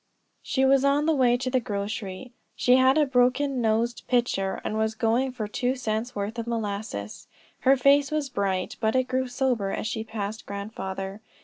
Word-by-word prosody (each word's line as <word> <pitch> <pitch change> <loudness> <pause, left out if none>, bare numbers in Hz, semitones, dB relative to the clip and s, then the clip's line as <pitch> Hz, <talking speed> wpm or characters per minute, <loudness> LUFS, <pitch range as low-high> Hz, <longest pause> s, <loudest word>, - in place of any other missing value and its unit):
She 265 0 +1
was 270 0 +4
on 280 +2 +3
the 320 - +3
way 250 -4 +3
to 255 +1 -3
the 255 - +3
grocery. 205 +1 -5 0.2
She 250 +1 +4
had 260 +2 +5
a 305 - +4
broken 255 +1 +2
nosed 230 +1 0
pitcher, 235 -6 0
and - - -3
was 220 0 0
going 240 +3 +1
for 230 -4 -4
two 250 +4 -1
cents' 235 0 -3
worth 205 +3 -3
of 230 - -4
molasses. 205 - -4 0.3
Her 270 +1 +4
face 280 +2 +4
was 305 -2 -1
bright, 195 -6 -2
but 220 0 +1
it 255 - +4
grew 255 +1 -1
sober 245 -5 0
as - - -3
she 220 0 -2
passed 220 -1 -5
grandfather. 200 -1 -5
235 Hz, 185 wpm, -26 LUFS, 210-260 Hz, 0.3 s, had